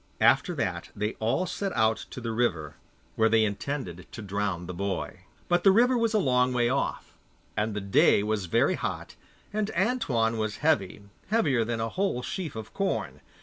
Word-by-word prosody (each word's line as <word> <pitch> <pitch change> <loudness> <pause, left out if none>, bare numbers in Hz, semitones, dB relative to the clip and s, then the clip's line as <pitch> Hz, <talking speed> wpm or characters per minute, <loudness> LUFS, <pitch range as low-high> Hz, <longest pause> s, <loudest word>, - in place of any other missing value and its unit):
After - - +4
that - - -2
they 105 +2 -2
all 120 +11 +1
set 195 +2 -3
out 110 -1 +1
to - - -7
the 115 -2 -3
river, 85 -11 0 0.4
where 110 0 +3
they 110 0 +4
intended 100 - -4
to 110 - -7
drown 100 -3 -2
the 90 - -6
boy. 100 +2 -4 0.2
But 175 0 +2
the 195 - +7
river 245 +5 +4
was 230 -2 +1
a - - +5
long 125 -7 +2
way 120 -1 +2
off, 140 +2 -2 0.4
and 105 0 -1
the 105 - -2
day 100 +1 +4
was 105 -3 -1
very - - +3
hot, - - -4 0.4
and 215 0 0
Antoine 130 - +1
was 110 -1 -2
heavy, 105 - +1 0.2
heavier 155 - +2
than 115 0 -2
a 115 0 -1
whole 185 - -1
sheaf 170 -4 -4
of 110 -1 -7
corn. 195 -1 -2
115 Hz, 185 wpm, -27 LUFS, 105-170 Hz, 0.4 s, the